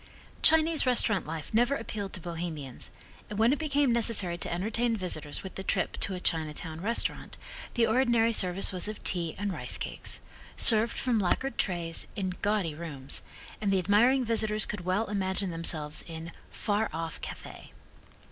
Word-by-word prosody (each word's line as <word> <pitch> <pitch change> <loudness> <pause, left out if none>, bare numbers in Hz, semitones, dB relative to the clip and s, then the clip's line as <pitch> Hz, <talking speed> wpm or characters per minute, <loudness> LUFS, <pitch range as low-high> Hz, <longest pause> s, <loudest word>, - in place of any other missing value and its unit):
Chinese 320 -2 +5
restaurant 220 -8 +3
life 160 +2 -6
never 240 +5 +3
appealed 210 -5 -5
to - - -4
Bohemians, 165 -6 -6 0.4
and 210 - -5
when 230 +4 +4
it 295 - -2
became 285 -4 +2
necessary 220 -7 +3
to 175 - -4
entertain 225 +6 0
visitors 155 -6 -4
with 190 0 -7
a - - -2
trip 190 - -1
to 195 - -1
a - - -5
Chinatown 160 -1 -1
restaurant 230 +4 -2 0.4
the 235 -2 +4
ordinary 230 -1 +3
service 185 -2 +2
was 185 +1 +2
of 215 0 -7
tea 170 -3 0
and 200 -1 -2
rice - - 0
cakes, - - -3 0.4
served 225 0 +5
from 245 -4 +1
lacquered 230 +7 0
trays, 170 -3 0
in 190 -2 -2
gaudy 205 -6 0
rooms, 145 -4 -5 0.4
and 205 - 0
the 195 - +3
admiring 235 +8 +3
visitors 220 -2 +2
could 205 - -5
well 185 +5 0
imagine 190 -2 0
themselves 155 -3 -1
in 165 0 -7 0.2
"far 210 +1 -1
off 165 0 -5
Cathay." - - -9
200 Hz, 165 wpm, -29 LUFS, 170-230 Hz, 0.4 s, Chinese